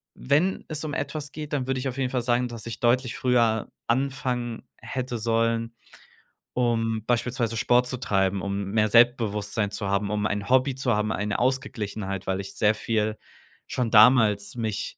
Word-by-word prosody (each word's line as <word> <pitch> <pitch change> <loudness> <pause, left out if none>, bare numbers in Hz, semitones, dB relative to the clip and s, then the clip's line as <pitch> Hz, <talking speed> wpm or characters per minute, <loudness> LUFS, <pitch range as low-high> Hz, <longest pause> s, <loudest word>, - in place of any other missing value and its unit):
wenn 155 +8 +1
es 155 -1 -4
um 150 - -4
etwas 150 -1 -4
geht, 150 0 -7
dann 130 -3 -1
würd 135 0 0
ich 130 +1 -2
auf 125 - -7
jeden 130 -2 0
Fall 125 - 0
sagen, 120 +1 +1
dass 115 -2 -7
ich 115 - -6
deutlich 125 0 +2
früher 115 -3 +2 0.2
anfangen 125 -2 -1
hätte 130 -2 -4
sollen, 115 +1 0 0.8
um 115 -3 0
beispielsweise 120 -1 0
Sport 125 +2 +3
zu 125 - -3
treiben, 95 -5 0
um 100 +1 -3
mehr 110 0 +2
Selbstbewusstsein 110 -3 +2
zu 100 -1 -3
haben, 100 +1 0
um 105 0 -1
ein 100 -1 -3
Hobby 130 +1 +3
zu 125 -4 0
haben, 105 +1 0
eine 105 0 -2
Ausgeglichenheit, 110 -7 -2
weil 95 0 0
ich 95 - -9
sehr 110 0 +3
viel 110 -1 -1 0.5
schon 120 -3 -2
damals 110 -2 +5
mich, 110 -3 -3
115 Hz, 170 wpm, -25 LUFS, 105-125 Hz, 0.8 s, damals